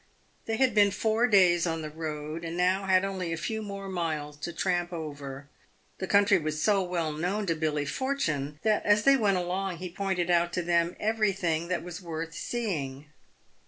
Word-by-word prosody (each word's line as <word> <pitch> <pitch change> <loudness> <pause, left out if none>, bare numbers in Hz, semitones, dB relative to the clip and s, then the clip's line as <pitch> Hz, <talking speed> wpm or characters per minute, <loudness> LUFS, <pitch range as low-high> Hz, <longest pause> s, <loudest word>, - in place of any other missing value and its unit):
They 225 0 -1
had 260 -2 +3
been 205 -1 +5
four 220 +5 +1
days 180 -5 +5
on 165 -1 -2
the 155 - -4
road, 155 0 -5
and 165 +1 -4
now 185 +2 +2
had 185 0 +4
only 185 -3 -3
a 165 - -2
few 220 +5 -3
more 200 -2 -6
miles 160 -5 -3
to 160 +3 -5
tramp 175 0 -1
over. 145 -4 -6 0.5
The 190 - -3
country 200 -1 +5
was 155 -1 -3
so 200 +2 +3
well 175 -4 -1
known 180 +7 -2
to 170 - +1
Billy 155 -2 -1
For 260 - -1
tune, 150 - -2
that 215 -1 +2
as 205 0 +4
they 275 0 +6
went 205 -7 +2
along 180 +1 -2
he 180 0 -6
pointed 180 -2 -1
out 175 0 +2
to 180 - -1
them 170 0 +1
everything 195 -7 0
that 180 -1 -1
was 175 +2 -7
worth 165 -1 -5
seeing. 150 - -3
175 Hz, 195 wpm, -28 LUFS, 160-200 Hz, 0.5 s, they